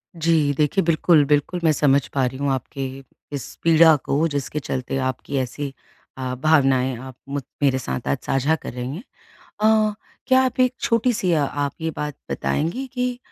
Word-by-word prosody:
जी 160 -3 +2
देखिए 155 +6 +2
बिल्कुल, 160 -1 +4
बिल्कुल 150 +5 +1
मैं 160 - +5
समझ 140 -2 +3
पा 135 -2 +2
रही 125 +1 -3
हूँ 140 0 -1
आपके 135 +1 -4 0.5
इस 135 - -6
पीड़ा 165 -1 +7
को 150 +4 +1
जिसके 145 0 -3
चलते 130 -1 -3
आपकी 130 +2 -3
ऐसी 135 +2 -3 0.4
अ, 130 -1 -3
भावनाएँ 135 -3 +3
आप 130 -1 -9
मुझ 140 0 -2 0.2
मेरे 135 -2 +3
साथ 125 -1 -4
आज 140 - +1
साझा 135 +4 +2
कर 145 - -8
रही 125 +3 -4
हैं 190 - -8 0.6
अ, 215 0 +3 0.3
क्या 260 0 +5
आप 260 - -2
एक 255 0 +3
छोटी-सी 230 -5 +1
अ 155 -3 +3
आप 145 0 -2
ये 160 - -1
बात 150 -1 -3 0.2
बताएँगी 165 - -1
कि 250 -1 -2
145 Hz, 175 wpm, -22 LUFS, 135-165 Hz, 0.6 s, पीड़ा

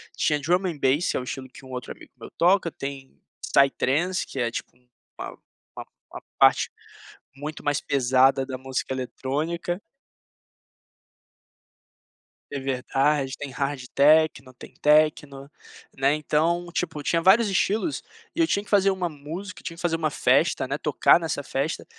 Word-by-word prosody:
tinha 150 -1 +1
drum 180 +6 +1
and 165 -4 -4
bass, 140 +5 +1
é - - +1
o 125 - -5
estilo 130 0 -6
que 135 +1 -14
um 130 - -12
outro 125 -1 -6
amigo - - -13
meu - - -9
toca, 180 +1 +3
tem 135 -1 -8 0.3
psytrance, 140 +6 +2
que 135 - -6
é, 120 -1 0
tipo, 120 - -7
um 125 0 -34 0.3
uma - - -7 0.4
uma - - -7 0.3
uma - - -8 0.2
parte - - +5 0.7
muito 150 +3 -7
mais 145 -1 0
pesada 135 0 +3
da 130 -1 -5
música 130 0 -3
eletrônica 155 +7 -3 2.7
É 140 - -3
verdade, 135 +1 0
tem 145 -2 -6
hard 140 0 -3
techno, 145 -3 +4
tem - - -13
techno, 150 -2 +2 0.5
né. 135 +2 +2
Então, 165 +3 0
tipo, 160 -4 -3
tinha 165 +2 +1
vários 210 +6 +5
estilos, 210 - 0 0.3
e - - -5
eu 330 - +4
tinha 200 -7 0
que - - -17
fazer 195 -1 +4
uma 185 -2 -1
música 165 +6 -8
tinha 165 -1 -6
que - - -10
fazer 170 -2 +1
uma 160 -2 0
festa, - - +2
né, - - -2
tocar - - +4
nessa 160 -4 -3
festa, 140 +4 -3
145 Hz, 160 wpm, -25 LUFS, 135-170 Hz, 2.7 s, parte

